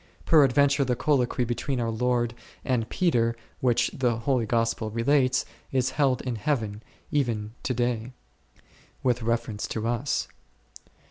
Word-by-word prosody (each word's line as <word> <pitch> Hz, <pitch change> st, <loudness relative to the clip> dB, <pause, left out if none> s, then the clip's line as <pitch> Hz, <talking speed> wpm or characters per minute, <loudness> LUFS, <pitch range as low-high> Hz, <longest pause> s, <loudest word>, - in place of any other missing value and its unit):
Peradventure 140 Hz, -2 st, +5 dB
the 125 Hz, -2 st, 0 dB
colloquy 125 Hz, -2 st, +1 dB
between 125 Hz, +3 st, -2 dB
our 115 Hz, -1 st, 0 dB
Lord 120 Hz, 0 st, 0 dB, 0.3 s
and 120 Hz, -4 st, 0 dB
Peter, 120 Hz, -10 st, +1 dB, 0.2 s
which 120 Hz, -2 st, +2 dB
the 120 Hz, -3 st, 0 dB
Holy 115 Hz, -1 st, 0 dB
Gospel 115 Hz, -1 st, 0 dB
relates, 130 Hz, +4 st, +2 dB, 0.3 s
is 130 Hz, -1 st, +1 dB
held 135 Hz, -3 st, +1 dB
in 125 Hz, -3 st, -3 dB
Heaven, 110 Hz, -4 st, -1 dB, 0.3 s
even 115 Hz, -7 st, 0 dB
to 130 Hz, -, -1 dB
day 120 Hz, +1 st, +2 dB
m, 125 Hz, -, -11 dB, 0.9 s
with 125 Hz, -2 st, +1 dB
reference 115 Hz, -2 st, -1 dB
to 110 Hz, 0 st, -3 dB
us. 120 Hz, +3 st, -1 dB
120 Hz, 135 wpm, -26 LUFS, 115-130 Hz, 0.9 s, Peradventure